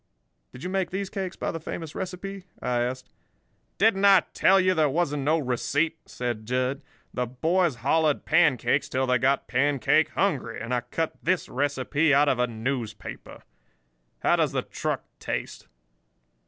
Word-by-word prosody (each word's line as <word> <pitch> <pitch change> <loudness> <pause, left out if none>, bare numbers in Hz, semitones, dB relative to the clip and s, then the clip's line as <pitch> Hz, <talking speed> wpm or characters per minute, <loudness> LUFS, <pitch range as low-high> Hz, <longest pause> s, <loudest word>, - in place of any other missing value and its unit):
"Did 125 - -11
you 180 - -3
make 190 -2 0
these 195 +1 -4
cakes 190 -3 -4
by - - -3
the 165 - -5
famous 160 0 -6
recipe?" 190 +1 -6
I 125 -1 -1
asked. 125 +1 -4 0.7
"Didn't 200 -1 +3
I 195 -2 +7
tell 195 +1 +5
you 185 0 +3
there 155 -4 +2
wasn't 150 -1 0
no 155 +4 +2
receipt?" 140 +4 0
said 120 -3 -4
Jud. 130 +3 -1 0.3
"The 125 -1 -1
boys 160 +5 +1
hollered 155 0 +2
pancakes 140 +1 +3
till 130 -1 0
they 125 -1 +2
got 135 +3 +1
pancake 135 0 +2
hungry, - - -1
and 115 +2 -4
I 125 - +1
cut 155 +7 -3
this 180 +1 0
recipe 145 +2 +1
out 145 +1 +4
of 125 - +1
a 125 - +2
newspaper. 120 0 -5 0.8
How - - +4
does - - +1
the - - 0
truck - - -3 0.2
taste?" - - -5
145 Hz, 160 wpm, -26 LUFS, 125-175 Hz, 0.8 s, I